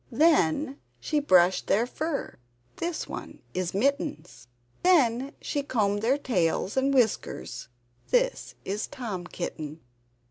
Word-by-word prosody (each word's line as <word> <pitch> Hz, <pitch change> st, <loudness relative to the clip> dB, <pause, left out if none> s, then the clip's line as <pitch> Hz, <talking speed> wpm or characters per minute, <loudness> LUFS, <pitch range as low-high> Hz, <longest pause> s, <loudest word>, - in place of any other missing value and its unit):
Then 285 Hz, -, +3 dB, 0.2 s
she 305 Hz, -, 0 dB
brushed 185 Hz, -10 st, +4 dB
their 215 Hz, +4 st, +3 dB
fur 300 Hz, -, -4 dB, 0.4 s
(this 340 Hz, -1 st, -3 dB
one -, -, -8 dB
is 185 Hz, 0 st, -2 dB
Mittens). 280 Hz, -, -1 dB, 0.3 s
Then 275 Hz, -7 st, +3 dB
she 290 Hz, -, -2 dB
combed 205 Hz, -7 st, 0 dB
their 250 Hz, +5 st, +3 dB
tails 190 Hz, -, 0 dB
and 265 Hz, +1 st, +2 dB
whiskers 245 Hz, -6 st, 0 dB, 0.4 s
(this -, -, +1 dB
is 205 Hz, +3 st, -2 dB
Tom 215 Hz, -10 st, -5 dB
Kitten). 155 Hz, -3 st, -5 dB
250 Hz, 115 wpm, -27 LUFS, 190-290 Hz, 0.4 s, brushed